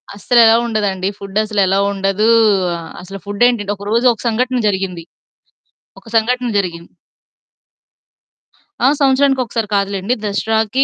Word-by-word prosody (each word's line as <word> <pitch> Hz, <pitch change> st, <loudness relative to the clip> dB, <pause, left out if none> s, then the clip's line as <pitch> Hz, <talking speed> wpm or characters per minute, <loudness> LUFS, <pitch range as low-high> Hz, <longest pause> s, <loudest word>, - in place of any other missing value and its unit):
అస్సలు 235 Hz, +4 st, +2 dB
ఎలోవ్ 230 Hz, +1 st, +4 dB
ఉండదండి? 200 Hz, -4 st, -1 dB
ఫుడ్డసలు 210 Hz, +1 st, -2 dB
ఎలోవ్ 195 Hz, +2 st, +1 dB
ఉండదు. 195 Hz, +2 st, 0 dB, 0.7 s
అసలు 195 Hz, +2 st, -9 dB
ఫుడ్డేంటండి, 205 Hz, 0 st, +1 dB
ఒక 200 Hz, 0 st, -11 dB
రోజు 235 Hz, +3 st, +1 dB
ఒక 225 Hz, -, -13 dB
సంఘటన 250 Hz, +2 st, 0 dB
జరిగింది, 190 Hz, -4 st, -2 dB, 1.0 s
ఒక -, -, -30 dB
సంఘటన 245 Hz, +2 st, +1 dB
జరిగింది. 170 Hz, -3 st, -4 dB, 2.0 s
ఆ! -, -, +6 dB
సంవత్సరానికి 270 Hz, -1 st, +2 dB
ఒకసారి 230 Hz, -2 st, -3 dB
కాదులెండి. 200 Hz, +3 st, -1 dB
దసరాకీ 220 Hz, +4 st, 0 dB
210 Hz, 115 wpm, -16 LUFS, 195-235 Hz, 2.0 s, ఆ